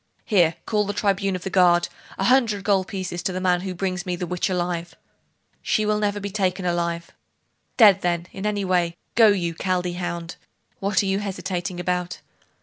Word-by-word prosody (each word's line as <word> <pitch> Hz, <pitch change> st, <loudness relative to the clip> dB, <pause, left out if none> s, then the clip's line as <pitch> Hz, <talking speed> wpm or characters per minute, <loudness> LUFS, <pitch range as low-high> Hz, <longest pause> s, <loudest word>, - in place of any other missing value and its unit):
'Here 175 Hz, -7 st, +3 dB
call 210 Hz, -2 st, +1 dB
the 205 Hz, -, -3 dB
tribune 195 Hz, -1 st, 0 dB
of 180 Hz, -, -6 dB
the 190 Hz, -, -4 dB
guard! 175 Hz, -2 st, +4 dB, 0.3 s
A -, -, -1 dB
hundred 225 Hz, -4 st, +3 dB
gold 195 Hz, -2 st, +2 dB
pieces 185 Hz, -4 st, -4 dB
to 190 Hz, +1 st, -1 dB
the 185 Hz, -, -3 dB
man 180 Hz, -1 st, +2 dB
who 185 Hz, -1 st, -5 dB
brings 185 Hz, -1 st, -2 dB
me 180 Hz, -2 st, -2 dB
the 180 Hz, -, -4 dB
witch 180 Hz, +1 st, -1 dB
alive!' 175 Hz, -2 st, -2 dB, 0.7 s
'She 215 Hz, -, +1 dB
will 210 Hz, 0 st, +1 dB
never 205 Hz, -1 st, 0 dB
be 200 Hz, 0 st, -5 dB
taken 190 Hz, -2 st, -1 dB
alive.' 170 Hz, -1 st, -1 dB, 0.7 s
'Dead, 205 Hz, -5 st, +7 dB
then 175 Hz, -1 st, 0 dB
in 195 Hz, +2 st, -4 dB
any 205 Hz, -2 st, -1 dB
way! 175 Hz, -2 st, +1 dB, 0.2 s
Go, 225 Hz, -1 st, +6 dB
you 180 Hz, -5 st, +1 dB
Chaldee 180 Hz, 0 st, -1 dB
hound! 170 Hz, -1 st, -4 dB, 0.4 s
what 195 Hz, 0 st, +1 dB
are -, -, -2 dB
you 195 Hz, 0 st, +1 dB
hesitating 185 Hz, -3 st, -4 dB
about? 180 Hz, 0 st, -2 dB
185 Hz, 190 wpm, -23 LUFS, 175-200 Hz, 0.7 s, Dead